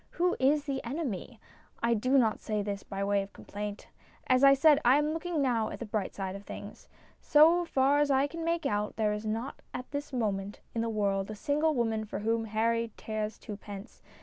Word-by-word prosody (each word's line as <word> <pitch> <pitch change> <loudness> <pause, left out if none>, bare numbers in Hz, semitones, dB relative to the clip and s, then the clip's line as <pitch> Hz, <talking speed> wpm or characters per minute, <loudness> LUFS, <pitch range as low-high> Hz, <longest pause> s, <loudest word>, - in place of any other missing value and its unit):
Who 360 +1 +1
is 285 +3 +3
the 275 -2 -3
enemy? 245 - -4 0.4
I 235 0 +3
do 255 +5 +2
not 225 -4 +3
say 210 -1 -2
this 200 -1 -3
by 195 0 -4
way 200 0 +2
of 195 0 -9
complaint. 205 0 -7 0.4
As 255 +1 +3
I 275 0 +8
said, 290 +1 +6
I 250 +3 +6
am 300 +1 +1
looking 330 -2 -1
now 235 -4 +1
at - - -6
the 235 - -6
bright 210 -2 -3
side 190 -1 -4
of 200 - -8
things. - - -9 0.3
So 330 +4 +5
far 275 -1 +3
as 295 -1 +2
I 270 0 +4
can 330 +3 -5
make 335 0 0
out, 210 0 -1
there 215 -1 +1
is 210 +1 -4
not 225 +5 -3
at 250 - -6
this 285 +1 -4
moment 205 -5 -2
in 230 - -1
the 230 - -1
world 200 -2 0
a 215 - -5
single 300 +7 +1
woman 225 -3 0
for 210 - -5
whom 225 +2 0
Harry 230 +1 0
cares 215 -1 -4
twopence. 205 -2 -9
230 Hz, 210 wpm, -30 LUFS, 210-280 Hz, 0.4 s, I